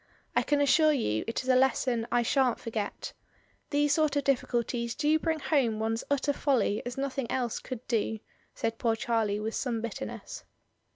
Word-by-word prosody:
I - - +4
can 290 - +1
assure 310 +2 +5
you 110 - 0
it 230 - -2
is - - -10
a 255 - +5
lesson 255 -3 +2
I 240 0 +3
sha'n't 255 0 +2
forget. 220 -3 -4 0.6
These 290 0 +2
sort 305 -2 +2
of 285 - +1
difficulties 240 -3 0
do 305 +1 +2
bring 320 -1 -1
home 265 -8 +1
one's 225 +1 -1
utter 285 +1 +1
folly 260 -8 +1
as 245 - -6
no 275 +1 0
thing 265 -3 -4
else 245 -3 -1
could 250 -2 -8
do," 225 -2 0 0.4
said 225 0 -2
poor 230 -1 +2
Charlie 225 -3 0
with 220 +1 -3
some 240 -4 -1
bitterness. 230 -1 -6
245 Hz, 180 wpm, -29 LUFS, 225-280 Hz, 0.6 s, assure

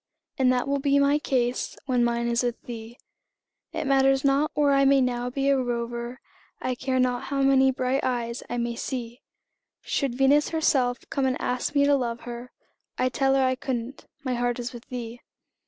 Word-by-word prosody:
And 255 -1 +4
that 250 +1 0
will 280 0 0
be 280 0 +2
my 280 +1 +3
case 250 -4 -1
when 250 -3 +2
mine 235 0 0
is 235 0 +1
with 245 -1 -2
thee. 230 0 -8 0.7
It - - -3
matters 270 0 +3
not 280 +2 +3
where 290 -1 +3
I 275 0 +4
may 275 0 +5
now 245 -1 0
be 275 +2 -1
a 275 - +4
rover, 240 0 -3 0.4
I 255 - -1
care 260 +1 -1
not 250 -1 +1
how 275 0 -1
many 270 -1 +5
bright 260 +1 0
eyes 240 -1 -2
I 245 - -2
may 235 0 -2
see; 240 -1 -5 0.6
Should 275 -4 -1
Venus 280 +2 +4
herself 265 -6 +2
come 270 -1 +1
and 255 - -1
ask 250 +4 -2
me 280 0 +5
to 285 - +4
love 240 -3 -2
her, 240 +1 -8 0.5
I'd 255 0 0
tell 270 0 +2
her 270 - +3
I 255 0 +2
couldn't 255 0 -5 0.2
my 255 -2 -1
heart 245 0 0
is 245 +1 -5
with 235 -1 -10
thee. 240 -1 -6
255 Hz, 195 wpm, -26 LUFS, 240-275 Hz, 0.7 s, may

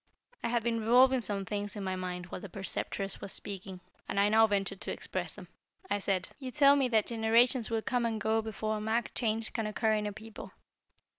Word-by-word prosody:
I - - -1
had 235 -1 0
been 230 -1 0
revolving 250 +3 +5
some 200 -3 -2
things 205 +1 -4
in 205 - -5
my 190 -1 -2
mind 180 -1 -4
while 180 - -7
the 200 - -8
Preceptress 195 +1 -4
was 195 - -5
speaking, 190 -2 -6 0.3
and - - 0
I 200 +1 +4
now 220 +1 +6
ventured 195 -1 -1
to - - -3
express - - -4
them. - - -11 0.4
I 205 - +2
said: 190 -2 0
"You 260 -2 -5
tell 280 +1 +6
me 275 -2 +2
that 220 -3 +2
generations 230 +1 +3
will 225 -1 -1
come 245 -2 0
and 220 -1 -2
go 220 +2 +1
before 215 0 -3
a - - -5
marked 220 +2 -1
change 225 -1 -1
can 225 -3 -1
occur 220 +1 +1
in 210 -1 0
a - - -3
people. 220 +2 -10
220 Hz, 220 wpm, -31 LUFS, 200-230 Hz, 0.4 s, now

